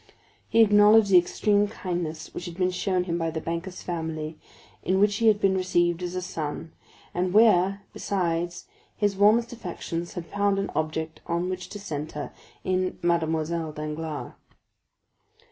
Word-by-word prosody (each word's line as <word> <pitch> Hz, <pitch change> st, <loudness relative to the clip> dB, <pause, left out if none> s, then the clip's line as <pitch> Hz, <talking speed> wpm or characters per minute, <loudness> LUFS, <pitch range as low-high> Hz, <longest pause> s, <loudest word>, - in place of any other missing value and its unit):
He 230 Hz, -, +5 dB
acknowledged 210 Hz, 0 st, +6 dB
the 180 Hz, -, +9 dB
extreme 205 Hz, +3 st, +1 dB
kindness 175 Hz, -6 st, -4 dB
which 175 Hz, -, -6 dB
had 175 Hz, -2 st, -7 dB
been 185 Hz, -1 st, +1 dB
shown 180 Hz, 0 st, 0 dB
him 170 Hz, -1 st, -2 dB
by 165 Hz, 0 st, 0 dB
the 160 Hz, 0 st, -3 dB
banker's 170 Hz, +3 st, -5 dB
family, 160 Hz, -2 st, -4 dB, 0.5 s
in 190 Hz, +1 st, +1 dB
which 205 Hz, 0 st, +3 dB
he 230 Hz, -, +2 dB
had 210 Hz, -1 st, +5 dB
been 195 Hz, -2 st, +3 dB
received 175 Hz, -2 st, +1 dB
as 180 Hz, 0 st, -4 dB
a 185 Hz, -, -2 dB
son, 160 Hz, -1 st, -5 dB, 0.4 s
and 180 Hz, +2 st, -1 dB
where, 200 Hz, -3 st, +5 dB
besides, 175 Hz, -2 st, -2 dB, 0.3 s
his 205 Hz, -2 st, +1 dB
warmest 220 Hz, +4 st, +4 dB
affections 175 Hz, -5 st, -5 dB
had 175 Hz, -, -5 dB
found 200 Hz, +1 st, 0 dB
an 195 Hz, -, -2 dB
object 155 Hz, +1 st, -3 dB
on 170 Hz, +1 st, -1 dB
which 185 Hz, 0 st, -5 dB
to 205 Hz, -, -7 dB
centre 150 Hz, -5 st, -5 dB, 0.3 s
in 185 Hz, 0 st, 0 dB
Mademoiselle 165 Hz, -1 st, 0 dB
Danglars. 155 Hz, 0 st, -5 dB
180 Hz, 155 wpm, -26 LUFS, 165-200 Hz, 0.5 s, the